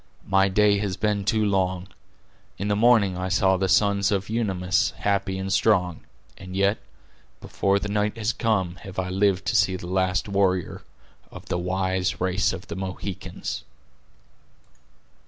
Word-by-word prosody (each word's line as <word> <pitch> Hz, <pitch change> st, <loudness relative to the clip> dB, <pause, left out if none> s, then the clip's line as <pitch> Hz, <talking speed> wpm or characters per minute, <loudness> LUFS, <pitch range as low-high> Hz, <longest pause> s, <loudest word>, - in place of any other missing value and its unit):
My 95 Hz, 0 st, +3 dB
day 100 Hz, +1 st, +3 dB
has 100 Hz, -3 st, -3 dB
been 105 Hz, -2 st, 0 dB
too 110 Hz, +1 st, +2 dB
long. 95 Hz, -2 st, 0 dB, 0.7 s
In 100 Hz, +2 st, -3 dB
the 105 Hz, -, +2 dB
morning 110 Hz, -4 st, +4 dB
I 90 Hz, +1 st, -3 dB
saw 95 Hz, 0 st, +3 dB
the 95 Hz, 0 st, -1 dB
sons 100 Hz, 0 st, +3 dB
of 100 Hz, +1 st, -1 dB
Unamis 95 Hz, -6 st, 0 dB
happy 100 Hz, -1 st, -1 dB
and 95 Hz, 0 st, -2 dB
strong; 90 Hz, -5 st, +2 dB, 0.4 s
and 95 Hz, -1 st, -9 dB
yet, 100 Hz, +2 st, +2 dB, 0.6 s
before 100 Hz, 0 st, 0 dB
the 100 Hz, -, -3 dB
night 105 Hz, +1 st, -1 dB
has 110 Hz, +2 st, -1 dB
come, 95 Hz, -6 st, -1 dB
have 95 Hz, +1 st, -11 dB
I 95 Hz, 0 st, -2 dB
lived 95 Hz, 0 st, +1 dB
to -, -, -1 dB
see 95 Hz, -2 st, +3 dB
the 90 Hz, -, -7 dB
last 95 Hz, +1 st, 0 dB
warrior 95 Hz, -3 st, 0 dB, 0.5 s
of -, -, -11 dB
the 85 Hz, -, -1 dB
wise 95 Hz, +1 st, -1 dB
race 95 Hz, +2 st, +1 dB
of -, -, -7 dB
the -, -, -7 dB
Mohicans." 95 Hz, 0 st, -5 dB
95 Hz, 155 wpm, -24 LUFS, 95-100 Hz, 0.7 s, morning